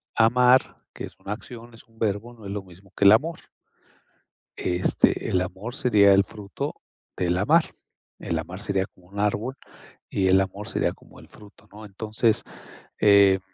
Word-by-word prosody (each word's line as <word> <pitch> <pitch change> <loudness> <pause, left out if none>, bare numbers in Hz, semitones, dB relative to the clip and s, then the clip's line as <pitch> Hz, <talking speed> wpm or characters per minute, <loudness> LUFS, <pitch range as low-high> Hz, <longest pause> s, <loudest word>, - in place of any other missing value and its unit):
amar, 125 +3 +3
que - - -6
es - - -13
una 100 - -8
acción, 120 +2 -11
es 115 - -16
un 115 0 -25
verbo. 110 +2 -2
No 115 -3 -15
es 100 - -6
lo 100 -1 -4
mismo 95 +1 -18
que 100 - +2
el 100 - +9
amor. 160 +9 +1 1.2
Este, 90 0 +1
el 90 - +1
amor 95 +6 -6
sería 100 -6 +5
el 100 0 +5
fruto 100 +1 -6 0.4
del 90 0 0
amar. 155 - +2 0.5
El 85 - -3
amar 90 +4 -6
sería 100 -2 -1
como 90 -2 -23
un 100 +2 -9
árbol, 105 +5 -1 0.5
y 95 -1 0
el 95 +1 +5
amor 95 +2 -5
sería - - 0
como - - -18
el - - -15
fruto, 105 0 -17
¿no? 105 +2 -11
Entonces, 110 +2 -1 0.6
eh, 100 -2 +6
100 Hz, 175 wpm, -24 LUFS, 95-115 Hz, 1.2 s, el